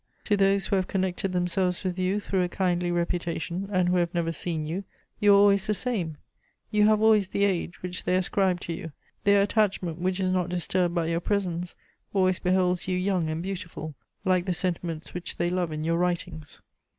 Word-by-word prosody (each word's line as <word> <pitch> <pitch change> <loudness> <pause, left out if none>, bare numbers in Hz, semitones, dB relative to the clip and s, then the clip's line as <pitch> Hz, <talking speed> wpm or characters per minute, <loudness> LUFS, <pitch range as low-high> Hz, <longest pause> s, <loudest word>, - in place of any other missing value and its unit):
To 210 - +2
those 195 0 +3
who 200 - +1
have 185 - 0
connected 190 0 -1
themselves 180 0 0
with 185 -1 -2
you 185 +3 +1
through 195 -2 -1
a 180 - 0
kindly 180 -2 0
reputation, 175 +1 -2
and 185 -2 +2
who 180 +1 +2
have 175 0 0
never 165 -1 0
seen 160 -1 -3
you, 175 +6 -3 0.4
you 205 0 +5
are 200 - +8
always 200 0 +4
the 210 - +1
same; 190 -11 -2 0.5
you 210 0 +4
have 215 0 +3
always 215 -3 +5
the 200 +1 0
age 180 -3 -2
which 180 0 -4
they 180 - +1
ascribed 185 0 +1
to 170 - -3
you; 165 -2 -7 0.3
their 200 0 +5
attachment, 195 -5 0
which 185 +1 0
is 185 -1 +1
not 180 -1 0
disturbed 180 0 0
by 170 -1 +1
your 165 +1 0
presence, 180 -2 -2 0.4
always 185 -1 +3
beholds 180 -1 +1
you 185 -1 0
young 180 -3 0
and 160 +2 -3
beautiful, 175 -5 -5 0.3
like 185 -1 +2
the 185 - +1
sentiments 170 -2 -3
which 180 0 -5
they 175 0 0
love 180 -3 0
in 155 0 -3
your 165 +1 +1
writings. 175 -4 -2
180 Hz, 200 wpm, -27 LUFS, 175-195 Hz, 0.5 s, are